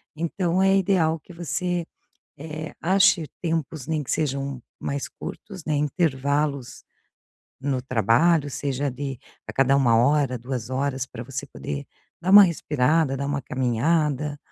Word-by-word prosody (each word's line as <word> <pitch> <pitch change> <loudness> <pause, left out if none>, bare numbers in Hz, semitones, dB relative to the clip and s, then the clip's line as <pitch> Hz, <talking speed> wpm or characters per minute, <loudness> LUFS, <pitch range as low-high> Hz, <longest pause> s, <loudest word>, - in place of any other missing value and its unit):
então 170 +2 0
é 195 0 +4
ideal 175 -4 +2
que 165 - -16
você, 175 +1 -2 0.5
eh, 155 +1 -7
ache 190 -1 +4 0.2
tempos 160 -4 -2
em 155 -1 0
que 135 - -10
sejam 140 -4 -2 0.2
mais 140 0 -3
curtos, 190 -6 -9
né, 155 - 0
intervalos 145 -2 -1 0.8
no 135 -2 -1
trabalho, 135 - +3
seja 140 0 -2
de 135 0 -5 0.3
a - - -6
cada 135 0 +3
1 120 -4 +4
hora, 135 +2 +3
2 125 -1 -5
horas 135 0 -1
pra 120 -2 -8
você 130 +1 -5
poder 70 -1 -6 0.3
dar 180 +2 0
uma 205 +1 +11
respirada, 155 -3 +1
dar 140 +1 -3
uma 140 0 -2
caminhada 145 +4 0
145 Hz, 140 wpm, -24 LUFS, 130-165 Hz, 0.8 s, uma